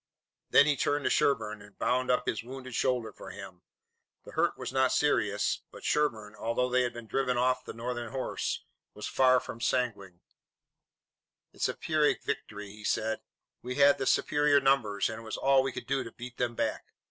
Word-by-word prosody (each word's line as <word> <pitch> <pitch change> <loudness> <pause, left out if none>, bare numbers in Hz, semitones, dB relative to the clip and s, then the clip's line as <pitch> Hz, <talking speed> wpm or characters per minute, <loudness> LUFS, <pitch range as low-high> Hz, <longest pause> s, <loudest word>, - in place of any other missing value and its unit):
Then 140 - +7
he 150 -1 +3
turned 145 +2 0
to - - +1
Sherburne 110 -6 +1
and 105 0 -16
bound 130 +1 0
up 125 0 +2
his 110 - -1
wounded 130 +1 -8
shoulder 125 -2 0
for - - -10
him. 95 -2 -10 0.6
The - - -10
hurt - - +1
was - - -5
not 130 0 +3
serious, 105 -8 +1
but - - -12
Sherburne, 110 -9 0
although 115 +3 -1
they 125 0 +3
had 120 -2 -3
driven 125 +2 0
off 125 +1 +2
the - - -7
Northern 120 0 -4
horse, 130 -1 -3 0.3
was 105 - -6
far 130 -1 +4
from 115 - -9
sanguine. 105 -9 -1 1.3
"It's - - 0
a - - -3
Pyrrhic - - +1
victory," 105 -1 -5
he 105 +1 -13
said. 110 +1 0 0.4
"We 125 +1 -5
had 140 0 +5
the 135 - -1
superior 145 -1 +3
numbers, 130 -7 +2
and 110 0 -5
it - - -12
was 110 - -5
all 135 0 +4
we 135 0 -2
could - - -7
do 135 -1 0
to 115 - -9
beat 125 +1 -9
them 120 -1 -1
back. - - -2
125 Hz, 190 wpm, -30 LUFS, 110-130 Hz, 1.3 s, Then